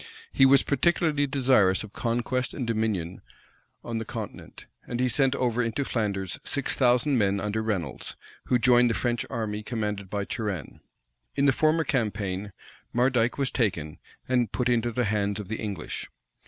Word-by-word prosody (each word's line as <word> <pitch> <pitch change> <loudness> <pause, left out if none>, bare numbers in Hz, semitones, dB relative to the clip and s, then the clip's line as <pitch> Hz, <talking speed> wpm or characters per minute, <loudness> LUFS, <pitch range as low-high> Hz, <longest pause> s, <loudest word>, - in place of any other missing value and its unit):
He 135 - +6
was 135 0 +6
particularly 150 -1 +2
desirous 130 -9 +3
of 110 - -11
conquest 120 +2 -1
and 130 - -3
dominion 110 -6 -1 0.6
on 115 -1 -3
the - - -3
continent;[*] - - -8 0.2
and 120 - -3
he 125 - +3
sent 135 +2 +2
over 125 -2 +1
into 115 +4 -1
Flanders 100 -6 -2
six 140 - -1
thousand 125 +1 +3
men 100 -1 +2
under 105 +2 -1
Reynolds, 105 -6 -3 0.3
who 125 - +3
joined 120 0 +5
the 115 - 0
French 120 -1 -1
army 105 -2 -3
commanded 105 -4 -3
by 100 0 -2
Turenne. 100 - -4 0.6
In 140 - +2
the 135 - +5
former 155 +4 +2
campaign, 105 -7 -2 0.4
Mardyke 125 -1 +2
was 135 -2 0
taken, 85 - -1 0.3
and 125 -4 +1
put 125 -1 0
into 120 -1 +1
the 125 +2 0
hands 100 -1 0
of 100 -2 -7
the 110 - -2
English. 100 -8 -5
115 Hz, 165 wpm, -27 LUFS, 105-130 Hz, 0.6 s, He